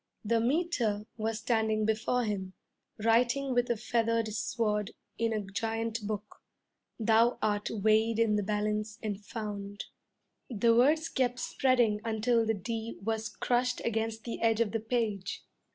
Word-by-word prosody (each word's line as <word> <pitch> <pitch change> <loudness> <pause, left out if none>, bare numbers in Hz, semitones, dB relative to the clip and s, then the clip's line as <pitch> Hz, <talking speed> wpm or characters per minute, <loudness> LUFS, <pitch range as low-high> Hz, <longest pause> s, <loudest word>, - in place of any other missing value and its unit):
The 230 +2 +2
'Meter' 240 -6 0
was 220 0 -2
standing 220 -2 +1
before 230 +3 +1
him, 195 -4 -3 0.5
writing 250 +4 +3
with 245 0 +1
a 240 - +1
feathered 230 0 0
sword 210 -1 -1 0.2
in 230 0 +1
a 215 -1 0
giant 225 +2 -3
book, 210 -1 -5 0.6
'Thou 225 +2 +4
art 210 -1 0
weighed 220 +1 +2
in 225 -2 +3
the 210 - +1
balance 210 +1 -1
and 205 -1 -3
found 205 -2 -5 0.3
' - - -50 0.2
The 230 0 +3
words 305 +7 +4
kept 250 -1 0
spreading 245 -5 +2
until 230 +1 +1
the 225 - +2
d 225 +3 -4
was 220 +1 -1
crushed 250 0 0
against 225 -1 -1
the 235 - -5
edge 225 -1 +3
of 230 -3 +2
the 225 - -1
page. 220 -4 -2
225 Hz, 150 wpm, -30 LUFS, 210-235 Hz, 0.6 s, Thou